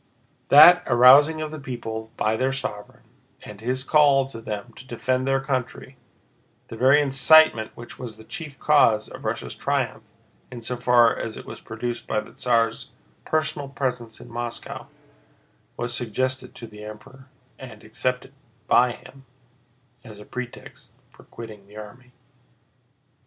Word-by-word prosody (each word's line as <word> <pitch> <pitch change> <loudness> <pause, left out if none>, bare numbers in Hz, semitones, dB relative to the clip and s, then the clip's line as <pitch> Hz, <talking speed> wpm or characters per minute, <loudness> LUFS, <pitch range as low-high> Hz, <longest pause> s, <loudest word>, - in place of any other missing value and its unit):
That 175 +5 +9
arousing 140 +6 +6
of 155 -1 -5
the 155 - -7
people 115 -4 -6
by 110 +1 0
their 130 +3 0
sovereign 105 -6 -5 0.4
and 105 -1 -11
his 130 +3 -2
call 140 -2 +4
to 115 -4 -10
them 110 +1 -6
to 130 - -13
defend 130 +2 -2
their 135 0 +2
country—the 130 -3 -8
very 130 +5 +4
incitement 135 -3 +4
which 120 - -11
was 120 -4 -8
the 110 - -14
chief 150 +3 -9
cause 115 -8 +3
of - - -11
Russia's - - -3
triumph - - -2 0.5
in 120 -2 -9
so 125 - -3
far 120 -2 +4
as - - -6
it - - -10
was - - -10
produced 120 -1 -6
by 110 - 0
the 105 - -10
Tsar's 115 -2 0 0.3
personal 155 -3 -1
presence 125 -4 -4
in - - -12
Moscow—was 120 0 -9
suggested 130 +2 -3
to 115 - -9
the 105 -1 -12
Emperor, 110 +5 -12 0.3
and 120 -5 -11
accepted 125 +4 -4 0.3
by 120 0 +3
him, 130 +4 -16 0.8
as 110 -4 -12
a 105 - -12
pretext 125 -1 -9 0.2
for - - -19
quitting 110 -4 -11
the 105 +1 -15
army. 120 +4 -12
125 Hz, 145 wpm, -23 LUFS, 115-135 Hz, 0.8 s, That